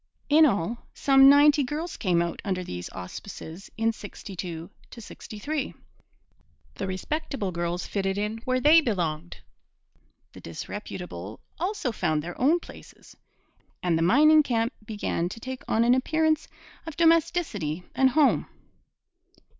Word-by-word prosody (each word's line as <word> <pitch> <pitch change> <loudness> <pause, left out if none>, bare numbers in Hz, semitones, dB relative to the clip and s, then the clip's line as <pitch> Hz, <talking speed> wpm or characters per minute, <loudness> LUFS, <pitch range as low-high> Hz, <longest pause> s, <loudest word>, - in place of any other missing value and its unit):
In 310 +1 +7
all, 225 - -2
some 270 -1 +6
ninety 290 +1 +6
girls 305 +6 -4
came 175 -5 +1
out 170 - -5
under 185 -3 -2
these 90 - -6
auspices 165 - -9
in 225 +1 +1
'62 180 -5 -8 0.2
'63. 250 +5 -6 1.0
The 195 - -4
respectable 225 - -3
girls 170 +1 -3
fitted 195 -1 -2
in 210 +2 -2
where 255 +2 -1
they 305 +5 +7
belonged. 175 - -2 1.0
The - - -12
disreputable 105 - -7 0.2
also 360 - -1
found 155 -8 -1
their 175 +1 -6
own 310 +7 +4
places. - - -14 0.7
And 175 -2 +2
the 165 - 0
mining 305 - +6
camp 235 -3 -1
began 205 -5 -2
to 230 - -8
take 260 +2 -6
on 225 - +2
an 240 +1 +5
appearance 315 +4 +1 0.4
of 320 - -7
domesticity 320 - +1
and 265 0 +4
home. 290 +1 +3
225 Hz, 130 wpm, -26 LUFS, 175-290 Hz, 1.0 s, In